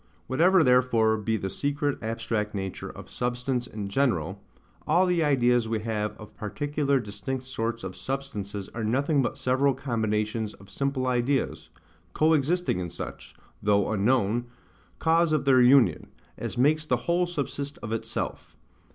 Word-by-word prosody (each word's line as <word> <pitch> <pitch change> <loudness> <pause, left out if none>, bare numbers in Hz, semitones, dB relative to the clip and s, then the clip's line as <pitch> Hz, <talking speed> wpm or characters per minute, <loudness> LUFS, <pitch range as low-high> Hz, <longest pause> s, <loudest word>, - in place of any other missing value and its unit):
Whatever 175 +6 +4
therefore 125 -4 +4
be 110 +1 -1
the 95 -2 -4
secret 145 +4 -1
abstract 110 -2 -2
nature 95 -1 -4
of - - -10
substance 125 0 -2
in 105 -4 -5
general, 100 - 0 0.5
all 175 +4 +4
the 175 -2 +2
ideas 125 -5 +3
we 110 -1 -1
have 105 -1 -2
of 105 - -12
particular 140 +5 -1
distinct 110 +5 -5
sorts 115 -2 -3
of 95 -1 -5
substances 105 -8 -4
are 115 - -5
nothing 140 +6 +2
but 120 - -2
several 130 +1 +2
combinations 110 -3 -1
of 95 +1 -16
simple 140 -2 -1
ideas, 125 +2 0 0.4
co 155 +1 +3
existing 160 - +1
in 90 -1 -3
such, - - -8 0.3
though 100 0 +2
unknown, 115 +2 +1 0.5
cause 165 0 +3
of 150 -2 +1
their 130 -2 +6
union, 125 0 +5 0.3
as - - -5
makes 150 +5 +3
the 130 -5 +1
whole 175 +1 +2
subsist 145 -3 -4
of 110 - -5
itself. 115 - -4
125 Hz, 150 wpm, -27 LUFS, 110-140 Hz, 0.5 s, their